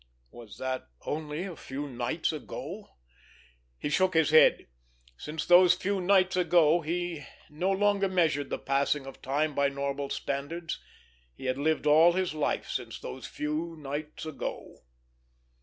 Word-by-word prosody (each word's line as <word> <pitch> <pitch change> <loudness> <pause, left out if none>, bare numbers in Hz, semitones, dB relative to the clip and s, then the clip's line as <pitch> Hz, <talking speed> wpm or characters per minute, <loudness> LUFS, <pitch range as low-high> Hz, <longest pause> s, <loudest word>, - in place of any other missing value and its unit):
Was 115 -3 -12
that 130 - -3 0.2
only 150 +2 -3
a 185 -3 -6
few 145 0 -6
nights 125 +5 -2
ago? 165 +6 -7 0.9
He - - -3
shook 185 +4 +2
his 160 -2 +4
head. 155 - +6 0.5
Since 155 - -5
those 175 0 +7
few 195 0 -1
nights 185 0 +3
ago 175 -2 +4
he 170 -1 -3 0.3
no 175 +6 -1
longer 200 0 +2
measured 160 -6 +1
the - - -2
passing 140 +1 0
of 135 - -10
time 145 +3 0
by 140 0 +2
normal 140 0 -3
standards; 155 +4 -4 0.5
he - - -10
had 130 +1 -1
lived 155 +1 +1
all 160 +3 +6
his 185 -2 -1
life 155 -1 -1
since - - -4
those 65 - -7
few 155 +3 -3
nights 150 +2 -6
ago! 155 - -6
155 Hz, 145 wpm, -29 LUFS, 140-175 Hz, 0.9 s, those